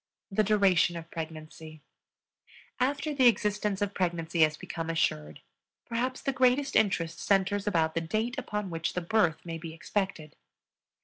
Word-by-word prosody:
THE 215 +2 +2
DURATION 195 -4 +3
OF 165 0 -9
PREGNANCY. 155 -1 -8 1.0
After 285 +4 0
the 260 -3 +5
existence 210 -3 +1
of 200 0 -3
pregnancy 170 -2 -1
has 155 -1 +4
become 165 +1 -5
assured, 75 - -1 0.4
perhaps 250 +3 -2
the 275 - 0
greatest 260 +2 +2
interest 165 -6 +1
centers 200 +1 +1
about 165 -5 +2
the 165 - 0
date 220 +9 -1
upon 210 -6 -4
which 165 0 -2
the 180 - -2
birth 175 -2 +1
may 165 -1 -5
be 160 0 -8
expected. 170 -4 -3
185 Hz, 145 wpm, -29 LUFS, 165-215 Hz, 1.0 s, the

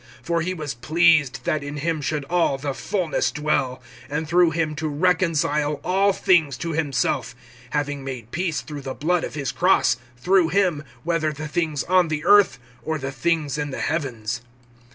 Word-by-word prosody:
(19)For 170 -1 0
He 185 +2 -2
was 150 -4 -4
pleased, 155 +2 +3
that 155 - 0
in 145 +1 -6
him 155 +1 -1
should 145 0 -2
all 170 -3 +1
the 140 0 -3
fullness 180 +2 -1
dwell; 135 -4 -1 0.3
(20)and 150 +2 -2
through 175 +2 +4
him 160 -1 -1
to 155 +1 -2
reconcile 150 -2 +1
all 195 +2 +3
things 165 -8 +2
to 170 - -3
himself, 135 -5 -1 0.3
having 145 0 -2
made 125 -4 -7
peace 170 -3 -1
through 150 -2 -8
the 135 -1 -5
blood 175 +3 0
of - - -5
his 140 -3 -2
cross; 185 -5 +3 0.2
through 180 +7 +3
him, 175 -4 +1 0.2
whether 165 -2 0
the 150 +1 -6
things 155 -2 -1
on 185 -1 +3
the 155 -1 -3
earth, 205 -12 +6 0.2
or 160 0 -2
the 135 -2 -4
things 150 +1 -1
in 145 0 -2
the 135 - -5
heavens. 125 -9 -2
155 Hz, 175 wpm, -23 LUFS, 140-170 Hz, 0.3 s, earth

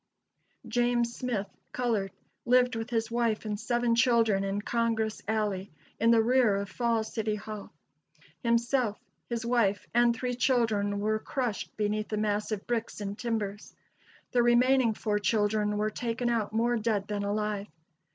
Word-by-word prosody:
James 240 0 +1
Smith 235 -6 -2 0.3
(colored) 225 -6 0 0.3
lived 250 0 +3
with 225 +1 -4
his 230 -1 -1
wife 230 -2 0
and 210 -1 -3
seven 240 +1 +1
children 230 -4 +3
in 195 +1 -1
Congress 225 0 -1
Alley, 205 -3 -1 0.3
in 230 - +3
the 230 -1 +5
rear 240 -3 +4
of 200 0 -3
Falls 230 -2 0
City 215 -1 -1
Hall. 210 0 -7 0.7
Himself, 235 -1 +1 0.3
his 235 -1 -3
wife 230 -5 +1
and 240 0 +4
three 250 +2 -2
children 225 -5 +1
were 215 +1 0
crushed 245 -3 -3
beneath 215 0 -1
the 215 - -3
mass 210 0 -1
of 210 -2 -3
bricks 230 -2 -2
and 200 -1 -4
timbers; 210 -3 -4 0.6
the 245 - +3
remaining 240 0 +4
four 210 -1 -1
children 210 0 +1
were 215 +1 0
taken 240 +1 -2
out 225 -3 0
more 235 +2 +1
dead 210 -3 -1
than 205 -1 -2
alive. 210 0 -2
225 Hz, 150 wpm, -29 LUFS, 210-240 Hz, 0.7 s, the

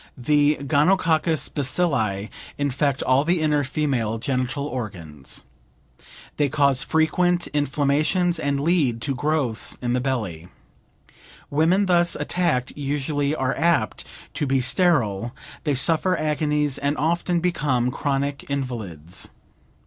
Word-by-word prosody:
The 145 +3 +3
gonococcus 160 +2 +2
bacilli 125 - 0 0.3
infect 140 0 0
all 130 +2 +3
the 170 +2 +1
inner 150 -2 +2
female 130 -6 -1
genital 130 +3 -2
organs. 90 - -6 0.9
They 145 -2 +2
cause 140 -2 +3
frequent 175 +3 +1
inflammations 150 +5 +1
and 140 -2 -1
lead 145 -8 +2
to 140 - -1
growths 135 -4 -1
in 120 -1 -1
the 125 - +1
belly. 105 -11 -3 1.0
Women 165 +7 +3
thus 175 -2 +3
attacked 150 -9 0
usually 145 +1 -1
are 130 -3 -1
apt 160 - +1 0.3
to 145 - -1
be 135 0 +2
sterile; 120 - +1 0.3
they 145 -2 +1
suffer 165 +6 +2
agonies, 150 -2 0
and 140 +1 -1
often 170 +3 +1
become 145 -8 0
chronic 140 +1 -2
invalids. 105 - -4
140 Hz, 115 wpm, -23 LUFS, 125-155 Hz, 1.0 s, The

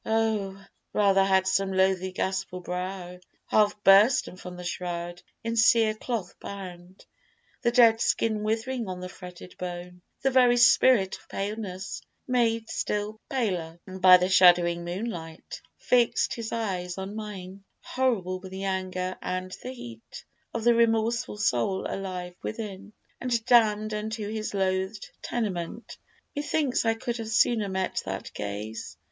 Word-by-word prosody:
Oh! 215 -3 -1 0.3
rather 195 -2 +4
had 190 -1 +3
some 190 +1 +1
loathly 190 0 +2
ghastful 190 -1 -3
brow, 180 0 -5 0.3
Half 210 -1 +2
bursten 200 +2 +5
from 180 -1 -9
the 180 - -8
shroud, 175 0 -4 0.2
in 230 0 -2
cere 225 -1 +5
cloth 215 -4 -4
bound, 185 -2 -9 0.6
The 235 - +3
dead 230 -2 +6
skin 220 -3 +1
withering 225 +2 -2
on 185 -1 -5
the 180 0 -6
fretted 180 0 -11
bone, 180 0 -6 0.2
The 270 - +3
very 250 -1 +5
spirit 235 -4 +5
of - - -24
Paleness 200 -2 -4 0.3
made 230 -3 +1
still 210 +1 -2
paler 180 -10 -2
By 185 -1 +6
the 180 0 0
shuddering 175 -2 +5
moonlight, 175 -3 -6 0.2
fix'd 240 -2 +2
his 230 -2 -5
eyes 185 -6 -3
on 190 +2 -5
mine 195 -3 -7 0.2
Horrible 210 -8 0
with 190 0 -10
the 190 +1 -5
anger 185 -1 -2
and 185 0 -4
the 255 - -6
heat 115 - -10 0.3
Of 230 - -4
the 240 +1 +5
remorseful 230 0 +1
soul 190 - 0
alive 180 -2 -5
within, 210 -2 -6 0.3
And 235 -3 -1
damn'd 215 -3 +4
unto 215 0 -3
his 215 -1 -4
loathed 190 +1 -1
tenement. 210 -2 -4 0.4
Methinks 290 -3 0
I 225 0 +3
could 235 +1 -3
have 225 -2 -5
sooner 215 -1 +2
met 190 0 -1
that 95 0 -5
gaze! 105 -2 -6
195 Hz, 140 wpm, -27 LUFS, 180-225 Hz, 0.6 s, dead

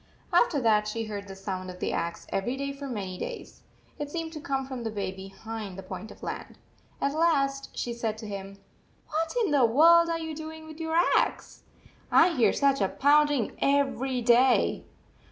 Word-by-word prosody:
After 315 -11 +4
that 215 -3 +3
she 225 +2 -3
heard 205 -2 -6
the 195 - -8
sound 190 -1 -5
of 180 0 -9
the - - -2
axe 170 0 -3
every 240 +7 -2
day 280 0 -3
for 280 0 -7
many 195 -7 -5
days. - - -7 0.4
It 295 -1 -4
seemed 325 +1 -4
to 310 - -6
come 270 -2 -2
from 260 -2 -6
the 225 - -2
bay 200 -3 -3
behind 195 +1 -8
the 195 - -7
point 215 +3 -7
of - - -14
land. - - -6 0.4
At 280 - 0
last 275 -4 +1
she 240 - -2
said 225 -2 -3
to 220 -1 -8
him: 195 -1 -7 0.3
" - - -36
What 325 +7 -2
in 375 - -1
the 285 -3 +4
world 335 +8 +6
are 335 - 0
you 320 -1 -5
doing 315 +1 -8
with 315 0 -11
your 320 0 -2 0.2
axe? - - -1 0.5
I 345 - +6
hear 265 -9 +3
such 275 -3 +2
a 195 - +3
pounding 290 -4 +3
everyday." 260 -3 +2
260 Hz, 190 wpm, -28 LUFS, 210-295 Hz, 0.5 s, world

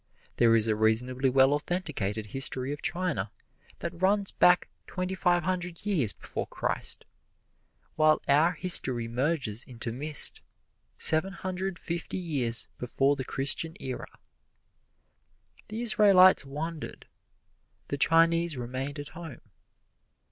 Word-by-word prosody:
There 115 -1 +4
is 110 -1 +2
a 110 - +1
reasonably 125 +5 0
well 135 +2 +4
authenticated 145 - -3
history 130 +4 -2
of 145 - -9
China 170 - -2 0.5
that 170 0 -6
runs 200 +1 +1
back 180 0 +3 0.2
twenty 185 0 -4
five 175 -2 +1
hundred 180 0 -4
years 160 - +1
before - - -7
Christ, - - -3 0.9
while 155 0 +4
our 155 +5 +3
history 135 -9 +4
merges 125 -2 -2
into 120 -2 -6
mist 145 +5 +1 0.6
seven 165 +5 +5
hundred 185 -1 -5
fifty 170 +2 -5
years 135 -10 -1
before 135 +3 0
the 135 - -5
Christian 140 +6 0
era. 130 -1 -6 1.6
The 220 +3 -5
Israelites 195 -7 +5
wandered; 155 +3 -7 0.8
the 140 - -3
Chinese 165 0 +3
remained 130 +4 -5
at 145 +1 -8
home. 165 -7 -10
150 Hz, 120 wpm, -27 LUFS, 130-175 Hz, 1.6 s, seven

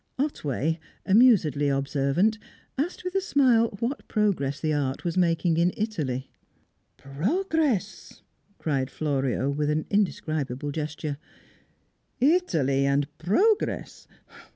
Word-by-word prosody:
Otway, 160 - -1 0.3
amusedly 190 - +4
observant, 140 +10 +1 0.4
asked 310 +8 -3
with 365 0 -4
a 390 - +1
smile 245 - +3
what 245 +5 -3
progress 175 -10 0
the 155 -1 0
art 140 -2 -2
was 170 - -1
making 170 -2 +2
in 170 +2 +3
Italy. 150 - -3 0.7
"Progress!" 240 - -2 0.3
cried 135 -4 -1
Florio, 135 -3 -1
with 145 +1 -1 0.2
indescribable 155 -8 -1
gesture. 150 -1 -4 1.0
"Italy 170 - +2
and 140 +1 0
progress! 390 - 0
165 Hz, 100 wpm, -26 LUFS, 140-225 Hz, 1.0 s, amusedly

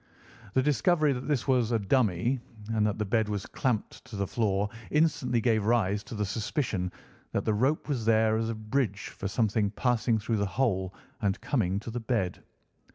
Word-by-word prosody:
The 130 - +4
discovery 150 +1 +3
that 125 0 -5
this 145 -5 0
was 125 -4 +2
a 115 - +3
dummy, 115 +2 +1 0.3
and 105 -1 +3
that 105 - -1
the 105 - -1
bed 110 +1 +1
was 100 -2 -2
clamped 120 -5 -2
to 115 - -9
the 100 0 0
floor, 100 -1 0 0.2
instantly 150 -6 +2
gave 110 -2 +2
rise 105 -3 +2
to - - -7
the 105 -1 -1
suspicion 105 - -2 0.4
that - - 0
the 110 - +2
rope 130 +9 +1
was 135 -6 -1
there 110 -1 +4
as 115 0 0
a 115 - -2
bridge 110 -2 -1
for 100 - -3
something 105 -1 +1
passing 115 +1 +1
through 110 +1 -1
the 100 - +1
hole 95 -3 0 0.3
and 100 -2 0
coming 100 -9 0
to 115 - -6
the 120 - -3
bed. 110 -6 -1
110 Hz, 190 wpm, -29 LUFS, 105-125 Hz, 0.4 s, The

